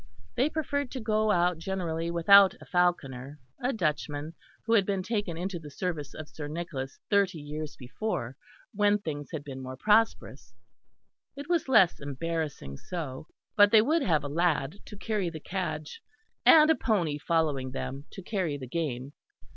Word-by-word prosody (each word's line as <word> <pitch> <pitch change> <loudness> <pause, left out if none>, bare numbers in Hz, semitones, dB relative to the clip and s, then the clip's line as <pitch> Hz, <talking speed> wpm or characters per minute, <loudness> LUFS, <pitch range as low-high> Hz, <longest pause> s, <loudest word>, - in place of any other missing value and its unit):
They 260 +5 +2
preferred 285 -3 -2
to 260 - -4
go 215 -1 +1
out 175 -3 +2
generally 170 -2 -2
without 190 +3 +6
the - - -14
falconer, 145 -6 0 0.2
a 250 +2 +1
Dutchman, 150 - -2 0.3
who 225 - +1
had 210 -4 +5
been 195 -1 -1
taken 205 -6 -2
into 180 0 -3
the 150 -2 -10
service 150 -2 -4
of 155 -1 -7
Sir 150 -1 -7
Nicholas 150 -4 -5
thirty 200 -4 +3
years 150 0 -6
before 130 - -4 0.4
when 205 0 +3
things 150 -7 -5
had 155 -3 -5
been 135 -2 -7
more 130 0 -7
prosperous; 175 - +1 0.8
it 285 +1 -8
was 340 -6 0
less 205 -9 +5
embarrassing 145 - -4
so; 155 -5 -6 0.3
but 205 -1 +7
they 215 0 +6
would 315 +7 +2
have 160 - +2
a - - -3
lad 160 +2 0
to 210 - -10
carry 205 -4 -1
the 160 -1 -7
"cadge," 155 -4 -4 0.5
and 310 0 +8
a - - +4
pony 170 - 0
following 150 -5 0
them 135 +2 -5
to 190 - -8
carry 175 -8 -2
the 135 - -7
game. 135 -2 -3
170 Hz, 165 wpm, -28 LUFS, 145-205 Hz, 0.8 s, and